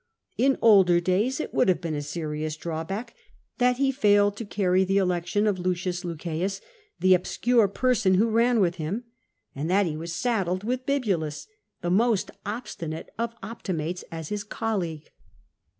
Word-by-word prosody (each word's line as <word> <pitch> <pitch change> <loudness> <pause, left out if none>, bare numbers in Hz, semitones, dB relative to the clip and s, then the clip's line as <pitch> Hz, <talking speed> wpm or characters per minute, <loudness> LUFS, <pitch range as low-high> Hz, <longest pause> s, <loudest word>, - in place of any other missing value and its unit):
In 270 +2 +3
older 190 -6 +6
days 195 - +1
it - - -4
would - - +3
have 180 - +3
been 165 -3 -3
a 145 - -2
serious 155 0 -4
drawback 170 +9 -4 0.5
that 250 0 +3
he 270 0 +2
failed 205 -6 +3
to 230 - -5
carry 190 -2 +2
the 195 +1 +1
election 180 +2 +1
of 205 -3 +1
L. 180 - -6
Lucceius, 180 0 -2 0.4
the 185 0 +5
obscure 225 +5 +2
person 200 -2 +2
who 215 +5 +3
ran 235 +1 +3
with 180 -3 +2
him, 180 +9 -3 0.5
and 145 +4 -3
that 195 +2 +3
he 160 -3 -2
was 165 +2 -5
saddled 185 -1 -1
with 255 +3 -2
Eibulus, 195 - -1 0.4
the 175 - -1
most 220 +1 +2 0.2
obstinate 170 -8 -5
of 230 0 -2
Optimates, 180 -5 -4
as 160 -2 -6
his 210 -1 -3
colleague. 190 -8 -3
190 Hz, 160 wpm, -26 LUFS, 170-225 Hz, 0.5 s, older